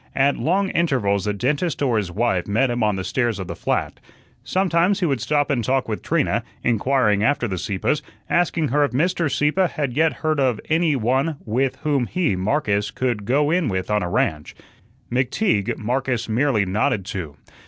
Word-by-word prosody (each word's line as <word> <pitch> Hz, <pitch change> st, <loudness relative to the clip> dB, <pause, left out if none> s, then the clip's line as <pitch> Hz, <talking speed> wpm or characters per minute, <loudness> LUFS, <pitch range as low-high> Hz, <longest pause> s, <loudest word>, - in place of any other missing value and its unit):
At 140 Hz, +1 st, +3 dB
long 190 Hz, +4 st, 0 dB
intervals 120 Hz, -, +1 dB
the 105 Hz, -, 0 dB
dentist 145 Hz, -, -1 dB
or 125 Hz, -5 st, +2 dB
his 100 Hz, -4 st, -1 dB
wife 95 Hz, -3 st, 0 dB
met 120 Hz, +5 st, +1 dB
him 120 Hz, 0 st, -2 dB
on 105 Hz, -2 st, +2 dB
the 95 Hz, -, -3 dB
stairs 120 Hz, +2 st, 0 dB
of 95 Hz, -, -5 dB
the 85 Hz, -1 st, -6 dB
flat. -, -, -2 dB, 0.4 s
Sometimes 185 Hz, +1 st, +1 dB
he 180 Hz, -, +1 dB
would 135 Hz, -7 st, 0 dB
stop 145 Hz, +2 st, +1 dB
and 125 Hz, -4 st, 0 dB
talk 130 Hz, +3 st, 0 dB
with 110 Hz, -2 st, -3 dB
Trina, 150 Hz, -7 st, 0 dB, 0.2 s
inquiring 115 Hz, -3 st, +2 dB
after 135 Hz, -1 st, +1 dB
the 95 Hz, -4 st, -3 dB
Sieppes, 100 Hz, -, -1 dB, 0.3 s
asking 170 Hz, -3 st, +1 dB
her 145 Hz, +4 st, +2 dB
if 145 Hz, -, -1 dB
Mr. 165 Hz, +2 st, +1 dB
Sieppe 155 Hz, +6 st, +2 dB
had 145 Hz, -6 st, -3 dB
yet 160 Hz, +1 st, +3 dB
heard 155 Hz, -2 st, +1 dB
of 125 Hz, -5 st, +1 dB
any 160 Hz, -2 st, +3 dB
one 130 Hz, +6 st, 0 dB
with 125 Hz, +4 st, 0 dB
whom 140 Hz, -6 st, +1 dB
he, 175 Hz, -, 0 dB
Marcus, 105 Hz, 0 st, 0 dB
could 120 Hz, -4 st, -2 dB
"go 145 Hz, +5 st, +2 dB
in 175 Hz, -3 st, +1 dB
with 95 Hz, -2 st, -2 dB
on 105 Hz, 0 st, +2 dB
a 90 Hz, -, -2 dB
ranch." 75 Hz, -3 st, -1 dB, 0.6 s
McTeague, 125 Hz, -, 0 dB
Marcus 125 Hz, +1 st, -1 dB
merely 115 Hz, -2 st, +1 dB
nodded 95 Hz, 0 st, 0 dB
to. 90 Hz, -9 st, -5 dB
130 Hz, 185 wpm, -22 LUFS, 105-150 Hz, 0.6 s, At